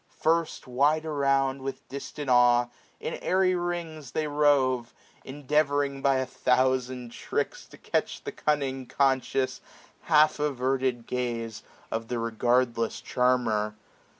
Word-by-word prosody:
First, 165 0 +1
wide 145 +5 +2
around. 135 -3 +1
With 135 0 -6
distant 140 +1 -7
awe, 120 -1 +5 0.3
in - - -4
airy 185 0 +2
rings 170 -6 -4
they 155 - 0
rove; 140 -5 +2 0.3
Endeavouring 145 0 0
by 135 -1 +3
a 130 0 0
thousand 130 -1 0
tricks - - -3
to - - -15
catch - - -2
The - - -4
cunning, 135 -4 -1
conscious, 130 -1 0 0.4
half 155 -1 +4
averted 130 -3 0
glance 115 -3 -3
620 - - -15 0.3
Of 115 0 -3
the 120 - -2
regardless 115 0 0
charmer. 115 -4 +1
130 Hz, 125 wpm, -27 LUFS, 125-145 Hz, 0.4 s, awe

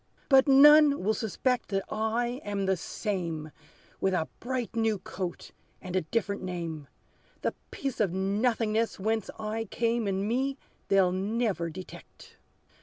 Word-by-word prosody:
But 270 -1 +6
none 290 -1 +7
will 215 +3 +2
suspect 245 +3 -1
that 195 -1 0
I 235 +4 -1
am 200 -1 -2
the 190 0 +2
same; 170 -4 -4 0.5
With 190 -1 +1
a 160 -3 0
bright, 245 -2 -3
new 225 -2 +1
coat, 185 -1 -6 0.3
and 185 -1 -6
a 185 - +3
different 200 +3 -2
name; 170 -5 -5 0.6
The - - 0 0.2
piece 275 -3 -4
of 205 -5 +2
nothingness 215 +3 0
whence 220 +2 -1
I 220 +1 -3
came 230 +1 0
In 195 +1 -1
me 265 +4 0 0.3
they'll 190 -2 +4
never 195 -2 -1
detect. 185 +3 -12
215 Hz, 140 wpm, -29 LUFS, 185-235 Hz, 0.6 s, none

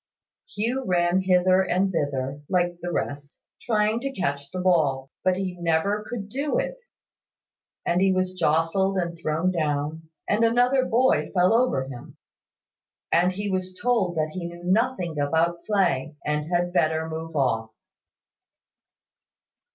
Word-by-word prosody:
Hugh 240 +6 -1
ran 175 -2 +2
hither 185 0 +4
and 190 +1 +1
thither, 140 -3 -2
like 175 -2 0
the 175 - -3
rest, 145 -3 -4 0.2
trying 215 0 +1
to 275 +2 -3
catch 140 - -3
the 185 - -5
ball; 145 -7 +1
but 185 -1 +2
he 190 -2 -3
never 175 +5 +1
could 210 -5 -5
do 280 - -1
it; - - -2 1.1
and 175 +2 +1
he 195 0 +4
was 185 0 0
jostled, 180 +3 +1
and 170 -2 -1
thrown 165 +2 0
down, 155 -1 -2 0.2
and 210 +3 +2
another 245 +3 +3
boy 255 +2 +2
fell 180 +3 +4
over 230 - +2
him; 125 -3 -10 0.9
and 180 +2 +3
he 205 +2 -4
was 185 0 -3
told 225 -8 +1
that 155 -1 -1
he 180 -2 -4
knew 175 0 -10
nothing 185 - 0
about 165 +4 +1
play, 185 -8 +1
and 150 +2 -1
had 175 0 0
better 160 -2 +1
move 160 0 -6
off. 115 -5 +1
180 Hz, 145 wpm, -25 LUFS, 160-195 Hz, 1.1 s, hither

